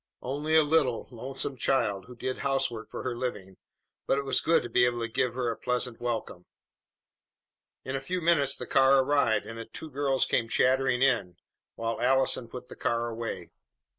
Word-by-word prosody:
Only 145 +5 -1
a 160 - +7
little, 145 -6 +1
lonesome 130 +3 -5
child 105 -9 0
who 125 - -12
did 130 +2 -4
housework 135 -5 -1
for - - -6
her 125 -2 -2
living, 105 -7 -5 0.5
but - - +2
it 140 - -1
was 135 - +1
good 165 -4 +3
to - - -4
be 125 +1 +3
able 120 -1 0
to 115 - -1
give 120 +1 -1
her 125 -2 0
a - - -4
pleasant 125 -1 -2
welcome. 115 -7 -4 1.4
In 130 - -3
a 135 - -2
few 180 +7 -2
minutes 160 -5 +2
the - - -5
car 135 0 +5
arrived, 130 -5 +2
and 115 0 -8
the 115 - -6
two 155 +7 -10
girls 135 -1 +1
came 115 - 0
chattering 130 0 +2
in, 115 -10 +2 0.4
while 115 0 -3
Allison 130 -1 +2
put 125 +2 -9
the - - -11
car 120 0 -1
away. 115 -6 -5
125 Hz, 190 wpm, -28 LUFS, 115-135 Hz, 1.4 s, a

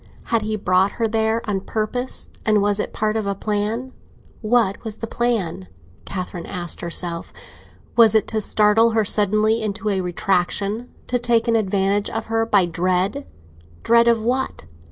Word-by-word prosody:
Had 230 -1 0
he 215 +1 -2
brought 190 -1 +2
her 230 -1 0
there 225 +1 0
on 195 -2 -1
purpose, 225 +5 -3 0.2
and 215 -1 +3
was 205 0 +1
it - - -2
part 215 0 -1
of 220 -2 -1
a 200 - -1
plan? 215 +6 -2 0.5
What 215 -3 +1
was 220 -2 -5
the - - -4
plan? 220 - -2 0.4
Catherine 180 -2 -5
asked 175 -3 -4
herself. 170 0 -3 0.6
Was 225 -2 +6
it 220 - +4
to 220 -1 -1
startle 215 +2 +3
her 220 - +3
suddenly 215 +2 +2
into 215 0 -2
a 195 -2 0
retractation—to 195 +7 -2
take 235 -1 +2
an 230 - +3
advantage 200 -1 +1
of 225 0 -4
her 225 0 +1
by 200 -5 +4
dread? 185 +9 -1 0.6
Dread 235 0 +4
of 230 -2 +3
what? 255 +3 -1
215 Hz, 160 wpm, -21 LUFS, 195-225 Hz, 0.6 s, Was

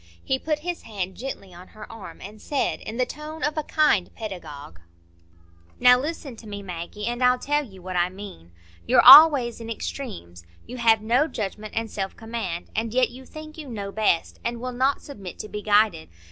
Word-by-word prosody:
He 265 - 0
put 305 +1 -1
his 350 -1 -3
hand 190 -4 -5
gently 200 -7 -7
on 180 +2 -13
her - - -8
arm, 225 -3 -11
and 210 +2 -10
said, 285 -2 -1
in 220 - -7
the 255 - +2
tone 305 +4 -8
of 295 +1 0
a 310 - 0
kind 295 -11 +2
pedagogue,— 150 - -8 1.0
"Now 250 0 +7
listen 290 -2 -5
to 220 - -12
me, 205 -1 -7
Maggie. 180 +4 -6
I'll 250 +1 +2
tell 290 +3 0
you 190 -8 -14
what 185 0 -6
I 175 0 +2
mean. 185 - -11 0.4
You're - - +5
always 265 -4 +9
in 230 - -7
extremes; 200 - -6 0.2
you 250 - -8
have 225 -2 +3
no 245 +7 +2
judgment 215 -4 -5
and 225 -1 -2
self 195 -1 -4
command; 225 -7 -5
and 225 +1 -2
yet 255 -1 +3
you 260 +2 -12
think 310 0 -10
you 295 -3 -8
know 200 -4 -5
best, 210 -5 0
and 235 0 -3
will 250 +1 -5
not 265 +3 +1
submit 200 - -9
to - - -7
be 210 0 -6
guided. 205 - +2
225 Hz, 195 wpm, -24 LUFS, 195-260 Hz, 1.0 s, always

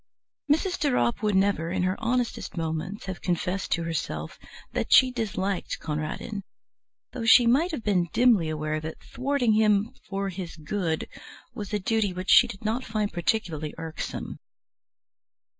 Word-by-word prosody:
Mrs. 355 +4 +1
de 295 - +2
Ropp 120 - +1
would 210 -2 +1
never, 190 -4 +2
in 180 +1 -1
her 185 +1 +1
honestest 240 -5 -1
moments, 165 +5 -3
have 190 -2 -6
confessed 180 +2 -1
to 170 - -1
herself 165 -1 -4 0.3
that - - -2
she 260 -1 +7
disliked 200 -5 -2
Conradin, 155 +7 -4 0.7
though 230 - -5
she 240 +2 +8
might 275 +9 +3
have 305 -10 -4
been 185 -4 +2
dimly 225 -10 +4
aware 155 0 -2
that 160 +1 -7
thwarting 255 -4 0
him 210 0 +3 0.2
"for 195 0 -2
his 180 -2 -6
good" 160 0 -2 0.5
was 210 -4 -6
a 210 - +1
duty 205 -1 0
which 185 +1 -2
she 245 - +8
did 220 -2 -9
not 230 +4 0
find 215 -3 -2
particularly 170 -4 -1
irksome. 160 -1 -5
195 Hz, 155 wpm, -26 LUFS, 170-225 Hz, 0.7 s, she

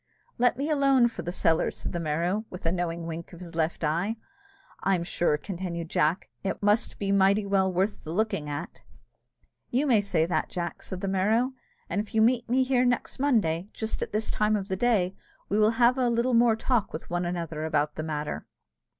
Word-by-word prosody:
"Let 245 0 +3
me 280 +2 -1
alone 275 -5 +4
for 230 - -7
the 175 - -4
cellar," 165 -3 +2
said - - -6
the 175 - -2
Merrow, 170 +6 0
with 180 - -9
a 165 - +2
knowing 170 -2 -2
wink 165 +1 -6
of 170 - -10
his 175 -1 -9
left 165 +1 -1
eye. 170 +8 0 0.7
"I'm 190 -3 +1
sure," 170 -3 +1
continued 170 -1 -5
Jack, 155 +5 +1 0.2
"it 195 +1 -3
must 210 +2 +2
be 195 -1 -1
mighty 200 +1 +4
well 195 -1 +2
worth 190 +4 -1
the 155 - -6
looking 175 -6 -1
at." 145 0 -6 0.9
"You 260 +5 +1
may 235 -7 +4
say 175 -5 +1
that, 175 - -1
Jack," 175 -2 -4
said 185 -1 -6
the 195 - -2
Merrow; 215 +7 +2 0.3
"and 200 +4 0
if 215 - -9
you 220 - +5
meet 240 0 +2
me 260 +2 +3
here 255 -1 +2
next 245 0 0
Monday, 205 - +1
just 220 0 -4
at - - -3
this 215 +1 -1
time 215 0 +2
of 195 -1 -3
the 190 - 0
day, 195 -4 +2 0.4
we 205 - +1
will 215 +2 +3
have 245 +2 +4
a 250 -2 +3
little 235 +2 +1
more 230 -1 +5
talk 225 -1 0
with 155 - -7
one 175 0 0
another 170 -3 -3
about 150 -1 0
the - - -4
matter." 150 -1 -4
195 Hz, 210 wpm, -27 LUFS, 170-225 Hz, 0.9 s, you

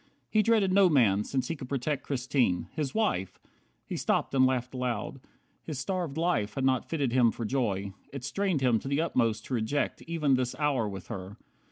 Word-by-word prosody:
He 215 - +4
dreaded 215 -4 +3
no 195 -1 +6
man, 110 - +4
since 130 +1 -2
he 165 - -2
could 130 -4 -9
protect 140 +1 -1
Christine. 130 -8 0
His 150 -4 -3
wife! 95 - 0 0.5
He - - -5
stopped - - 0
and 130 -1 +5
laughed 130 -1 -1
aloud. 125 +2 -3 0.4
His 155 -4 -6
starved 165 +1 -2
life 160 -12 0
had 135 -1 0
not 130 -2 +1
fitted 140 -7 0
him 125 -2 +5
for 115 +1 -4
joy. 100 -6 -1 0.2
It 140 -2 -7
strained 180 +2 0
him 120 -4 +3
to - - -8
the 140 +2 +1
utmost 115 -9 +1
to - - -5
reject 125 +5 -1
Even 155 -4 +1
this 130 -1 0
hour 135 -7 +1
with 95 -2 -7
her. 95 +2 -6
130 Hz, 195 wpm, -29 LUFS, 115-150 Hz, 0.5 s, no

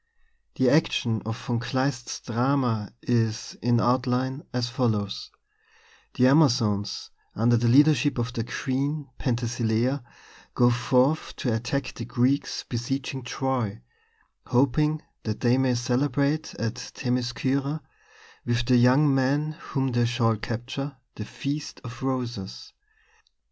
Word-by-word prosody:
The 130 - +2
action 120 -8 +2
of 110 0 -3
Von 120 -3 0
Kleist's 130 +1 -2
drama 120 -3 0
is, 115 -2 0
in 120 0 +3
outline, 130 +2 +1
as 125 -1 -1
follows: 110 -5 -1 0.9
The 125 - +4
Amazons, 120 -8 +3 0.2
under 120 +3 +3
the 120 +1 +2
leadership 145 +2 +5
of 120 +1 -2
their 115 -2 -2
queen, 140 +3 -2
Penthesilea, 120 +1 0 0.5
go 120 0 +5
forth 130 +5 +2
to 125 -6 -1
attack 125 +4 -2
the 115 - -6
Greeks 130 +3 0
besieging 130 +2 -3
Troy, 125 - -2 0.7
hoping 145 +5 +2 0.2
that 110 -1 -4
they 125 +1 +3
may 130 -2 +2
celebrate 140 +5 0
at 115 +2 -3 0.2
Themiscyra, 130 +4 -1 0.6
with 120 0 0
the 125 0 +4
young 130 +4 +5
men 140 +3 +1
whom 135 -3 -3
they 120 0 +2
shall 115 -2 +2
capture, 130 +6 -5 0.2
the 105 - -6
Feast 145 +6 -5
of 125 -2 -9
Roses. 120 - -4
125 Hz, 120 wpm, -26 LUFS, 120-135 Hz, 0.9 s, leadership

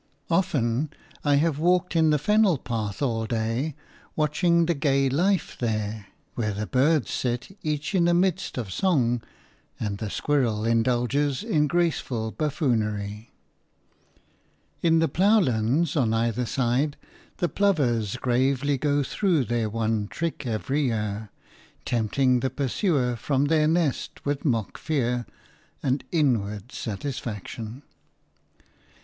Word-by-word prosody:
Often 145 -6 +1 0.3
I 145 -1 +3
have 150 0 +1
walked 180 +2 +2
in 160 -1 +4
the 150 - +4
fennel 210 +2 +3
path 115 -2 -3
all 115 -4 0
day, 115 +6 -1 0.4
watching 170 +3 +2
the 170 - +2
gay 140 -2 +2
life 180 +7 +1
there, 110 -3 -2 0.3
where 105 -3 -1
the 105 +1 -2
birds 140 +5 +2
sit 125 +8 -2
each 150 +4 -2
in 175 -3 +3
a 175 - +4
mist 180 -4 0
of 105 -7 -4
song 125 - +2 0.6
and 100 -2 -3
the 110 - -3
squirrel 115 -5 0
indulges 125 - +1
in 155 -10 +2
graceful 140 -9 0
buffoonery. 110 -8 -1 1.5
In 165 -1 +4
the 165 0 +3
ploughlands 160 - +2
on 115 -7 +2
either 115 +1 0
side 135 +3 0 0.4
the 175 - +1
plovers 125 - +1
gravely 130 +3 +1
go 145 0 +1
through 165 -2 +1
their 115 -2 -1
one 110 -1 -1
trick 155 0 -4
every 135 +6 -1
year, 105 -3 -2 0.6
tempting 125 +2 +2
the 130 - 0
pursuer 130 - 0
from 135 +4 0
their 155 0 +3
nest 160 -4 -1
with 145 +1 -2
mock 115 -7 -1
fear 125 -6 -1 0.6
and 135 +1 0
inward 115 - 0
satisfaction. 115 +1 -5
130 Hz, 125 wpm, -25 LUFS, 115-155 Hz, 1.5 s, in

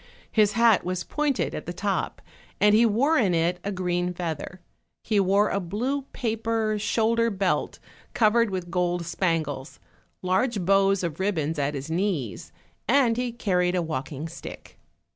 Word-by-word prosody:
His 210 -2 +3
hat 230 -2 +4
was 180 -1 -2
pointed 295 -3 -1
at - - -6
the - - -3
top, - - -2 0.4
and 210 0 +5
he 230 +2 +6
wore 275 +9 +2
in 190 -7 +2
it 170 +2 +1
a 200 - -2
green 180 -1 -1
feather; 170 +1 -5 0.4
he 215 -2 +1
wore 200 +2 +3
a 200 - 0
blue 245 +10 -2
paper 225 -2 -1
shoulder 230 +2 +1
belt 195 -3 -1 0.4
covered 230 0 +4
with 180 -2 -4
gold 175 -1 0
spangles, 160 -6 -2 0.4
large 195 +2 0
bows 195 0 +3
of 170 -1 -3
ribbons 165 -6 -1
at 145 +1 -1
his 140 +3 -5
knees, 165 - -2 0.4
and 245 -1 +4
he 245 0 -2
curried 180 -6 0
a 180 - +1
walking 150 0 -4
stick. 165 - -10
195 Hz, 155 wpm, -25 LUFS, 175-225 Hz, 0.4 s, he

